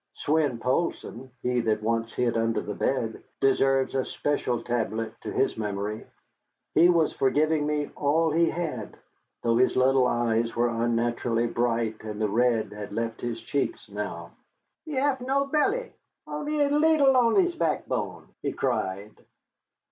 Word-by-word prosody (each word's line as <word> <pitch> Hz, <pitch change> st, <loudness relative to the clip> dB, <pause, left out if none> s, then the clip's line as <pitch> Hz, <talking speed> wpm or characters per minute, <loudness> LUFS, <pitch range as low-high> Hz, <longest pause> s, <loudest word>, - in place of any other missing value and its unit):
Swein 145 Hz, -5 st, +1 dB
Poulsson, 130 Hz, -1 st, -2 dB
he 125 Hz, 0 st, +1 dB
that 110 Hz, -2 st, 0 dB
once 115 Hz, 0 st, 0 dB
hid 120 Hz, -1 st, 0 dB
under 115 Hz, 0 st, +1 dB
the 105 Hz, -, -4 dB
bed, 115 Hz, -1 st, -1 dB, 0.2 s
deserves 135 Hz, 0 st, +2 dB
a 135 Hz, -1 st, +1 dB
special 125 Hz, -6 st, -1 dB
tablet 115 Hz, -2 st, -2 dB
to -, -, -5 dB
his -, -, 0 dB
memory. 105 Hz, 0 st, -3 dB, 0.7 s
He 170 Hz, +3 st, +6 dB
was 165 Hz, -3 st, +3 dB
for 135 Hz, -, +2 dB
giving 155 Hz, +1 st, +1 dB
me 150 Hz, -1 st, -1 dB
all 160 Hz, +3 st, +2 dB
he 165 Hz, +2 st, +3 dB
had, 155 Hz, -11 st, -4 dB, 0.5 s
though 115 Hz, -1 st, +2 dB
his 130 Hz, +1 st, +3 dB
little 130 Hz, 0 st, +4 dB
eyes 115 Hz, -1 st, 0 dB
were 120 Hz, +1 st, +2 dB
unnaturally 115 Hz, 0 st, 0 dB
bright 115 Hz, -2 st, -1 dB
and 105 Hz, -1 st, -6 dB
the 110 Hz, -1 st, +1 dB
red 115 Hz, 0 st, +1 dB
had 105 Hz, -1 st, -7 dB
left 115 Hz, +1 st, -3 dB
his 115 Hz, -1 st, -4 dB
cheeks 145 Hz, -, -2 dB
now. -, -, -5 dB, 0.5 s
"He 310 Hz, -3 st, -5 dB
haf 265 Hz, -1 st, +1 dB
no 270 Hz, +2 st, +1 dB
belly, 395 Hz, -, 0 dB, 0.3 s
only 300 Hz, 0 st, -3 dB
a 285 Hz, 0 st, +2 dB
leedle 295 Hz, -2 st, +4 dB
on 235 Hz, -2 st, +4 dB
his 360 Hz, -2 st, +3 dB
backbone!" 160 Hz, -2 st, -2 dB
he -, -, -2 dB
cried. 100 Hz, +3 st, -2 dB
125 Hz, 155 wpm, -26 LUFS, 115-165 Hz, 0.7 s, He